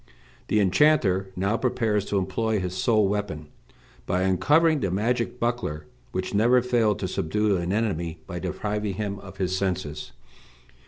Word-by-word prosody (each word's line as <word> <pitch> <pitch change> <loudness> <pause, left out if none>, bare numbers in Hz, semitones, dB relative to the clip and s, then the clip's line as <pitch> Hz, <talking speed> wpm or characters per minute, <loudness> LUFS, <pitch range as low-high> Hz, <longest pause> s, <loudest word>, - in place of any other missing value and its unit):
The 105 - +2
enchanter 95 -2 +3
now 100 +5 0
prepares 110 -5 0
to 100 - -1
employ 110 +3 0
his 90 -1 -4
sole 105 +2 +3
weapon, 95 -7 -3 0.6
by 90 +1 +1
uncovering 145 - +3
the 95 - -1
magic 115 +6 -1
buckler 120 -11 -2 0.3
which 95 +1 -3
never 120 +4 +4
failed 115 -5 +2
to - - -1
subdue 105 +5 0
an 85 +1 -2
enemy 95 -6 -1
by - - -6
depriving 105 -1 -3
him 100 -1 -3
of 95 0 -12
his 95 -1 -1
senses. 95 -5 -3
100 Hz, 150 wpm, -25 LUFS, 95-115 Hz, 0.6 s, never